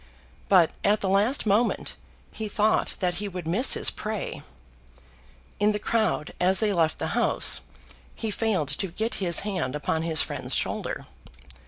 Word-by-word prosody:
But 180 -5 +5
at 210 +1 +2
the 195 - -1
last 205 +9 +2
moment 215 +4 +1 0.4
he 220 - -5
thought 210 +1 +1
that 180 -1 +1
he 205 - -3
would 180 -4 -6
miss 220 +11 +4
his - - +3
prey. 215 -1 -5 1.2
In 210 +1 +3
the - - -1
crowd 215 -7 -1
as 185 +1 +3
they 215 -2 +1
left 165 -3 +1
the - - -3
House - - +2 0.5
he 220 -2 -3
failed 205 -9 -1
to 150 +7 -1
get 220 +6 -3
his 175 -3 +3
hand 185 -10 -3
upon 160 +2 -1
his 160 -1 +4
friend's - - -3
shoulder. - - -2
200 Hz, 160 wpm, -26 LUFS, 170-215 Hz, 1.2 s, But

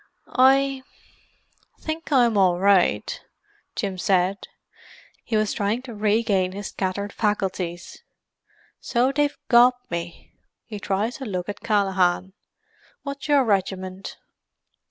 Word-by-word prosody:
"I... 270 +1 +4 1.0
think 315 0 -5
I'm 240 -5 +4
all 185 -3 +3
right," 195 -1 +2 0.5
Jim 195 -4 -3
said. 190 0 +1 0.8
He 225 - -1
was 215 -1 0
trying 210 +5 -1
to 250 -3 -8
regain 205 -3 +1
his 205 +1 -5
scattered 200 +1 -3
faculties. 190 -5 -2 0.8
"So 250 +2 +1
they've 290 0 0
got 245 +1 +6 0.2
me!" 170 0 -6 0.3
He 210 -3 -7
tried 205 +4 -1
to - - -4
look 180 -5 -3
at 205 - -5
Callaghan. 190 -3 +1 0.7
"What's 280 0 -6
your 290 -2 +4
regiment?" 190 -3 -2
205 Hz, 115 wpm, -24 LUFS, 190-245 Hz, 1.0 s, got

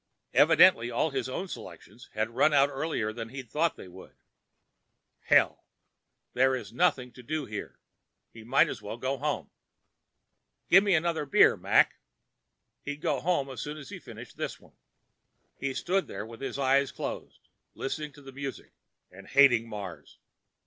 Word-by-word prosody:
Evidently 120 +1 +6
all 120 +6 0
of - - -14
his 130 -2 -2
own 180 +9 -4
selections 100 - -11
had 110 +2 -1
run 150 +6 +3
out 140 0 +5
earlier 135 -6 -2
than 115 0 -6
he'd 130 -2 -9
thought 165 +2 +1
they - - -11
would. 90 +1 -14 1.1
Hell! - - +3 0.7
There 130 +2 +4
was 130 - -5
nothing 130 -8 +1
to 125 - -13
do 150 +3 -3
here. 105 -3 -7 0.5
He 115 - -12
might 125 +5 +4
as - - -6
well 105 +3 -6
go 130 +3 -2
home. 150 -1 -3 1.2
"Gimme 195 +1 +6
another 160 -2 0
beer, - - +5
Mac." - - +3 0.8
He'd 145 0 -6
go 145 -3 0
home 155 -3 0
as 120 -3 -6
soon 150 +1 -5
as 140 -3 -10
he - - -8
finished - - -12
this - - -4
one. - - -21 0.9
He 140 - -2
stood 185 +8 -1
there 100 +2 -6
with 115 +2 -12
his 135 - -4
eyes 135 0 +2
closed, - - -7 0.3
listening 150 +2 -4
to 145 - -16
the 135 - -10
music 135 0 -7 0.4
and 100 +2 -14
hating 120 -5 +5
Mars. 100 -5 -8
135 Hz, 165 wpm, -28 LUFS, 115-150 Hz, 1.2 s, Evidently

